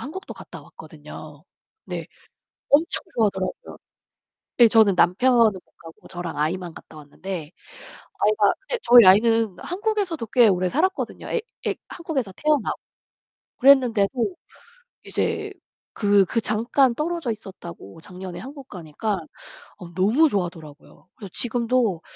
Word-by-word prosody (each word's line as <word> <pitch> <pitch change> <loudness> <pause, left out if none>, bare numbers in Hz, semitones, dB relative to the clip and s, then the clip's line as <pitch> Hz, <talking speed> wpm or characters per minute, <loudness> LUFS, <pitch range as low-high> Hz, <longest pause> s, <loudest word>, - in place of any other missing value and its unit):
한국도 345 +8 -8
갔다 - - -11
왔거든요. 155 -1 -12 0.4
네. - - -6 0.6
엄청 305 +4 +3
좋아하더라고요. 205 - -2 0.8
예 235 - +9
저는 220 -3 +5
남편은 245 +10 +3 0.2
못 185 -2 -14
가고 165 -1 -15
저랑 175 -2 -6
아이만 170 +3 -2
갔다 160 - -14
왔는데 155 +2 -7 0.7
아이가 210 -1 +3
근데 435 +5 -3
저희 240 -1 +8
아이는 220 +1 +4
한국에서도 385 - -2
꽤 240 0 +5
오래 185 -2 +1
살았거든요. 370 - -2
애 475 - 0 0.3
애 - - +1
한국에서 290 - -4
태어나고. 300 -6 0 0.8
그랬는데도 255 - +3 0.7
이제 - - -2 0.4
그 205 -2 +3
그 230 - -1
잠깐 235 +4 +1
떨어져 320 -3 -2
있었다고 175 - -10
작년에 180 +1 -9
한국 275 0 -10
가니까 185 +4 -4 0.6
어 175 -1 -11
너무 225 - +3
좋아하더라고요. 170 - -6
그래서 200 -4 -10
지금도 235 -6 0
215 Hz, 305 characters per minute, -23 LUFS, 180-265 Hz, 0.8 s, 예